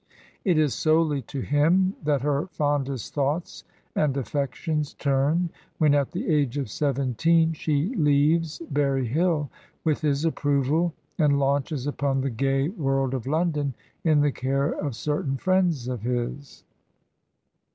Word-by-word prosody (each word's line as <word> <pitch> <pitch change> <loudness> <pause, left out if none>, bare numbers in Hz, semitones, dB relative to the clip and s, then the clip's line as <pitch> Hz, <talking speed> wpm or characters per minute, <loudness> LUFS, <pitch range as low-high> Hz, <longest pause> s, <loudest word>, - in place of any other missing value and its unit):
It 180 -5 +2
is 150 -4 +2
solely 155 -2 +2
to 135 - -4
him 170 +8 +2
that 145 -3 +1
her 145 +4 0
fondest 140 - -2
thoughts 145 +4 -2 0.3
and 145 -3 +1
a£Pections 145 +2 -2
turn 145 +5 +1 0.3
when 150 -2 +4
at 140 -2 +2
the 180 - -4
age 145 -5 +1
of 135 -7 -3
seventeen 150 +5 +2
she 155 - -1
leaves 155 - +2
Berry 140 -2 +1
Hill 155 +2 0 0.3
with 155 -3 +1
his 145 0 +1
approval 150 +2 +1 0.2
and 145 -3 +4
launches 140 0 0
upon 140 -2 0
the 135 0 -1
gay 135 +4 0
world 135 - -1
of 130 -2 -4
London 150 -3 0 0.3
in 155 -3 +4
the 145 0 +3
care 135 +3 0
of 140 -6 -3
certain 145 +1 -2
friends 180 -7 +1
of 125 -4 -3
his. 125 +3 -4
145 Hz, 140 wpm, -25 LUFS, 135-155 Hz, 0.3 s, when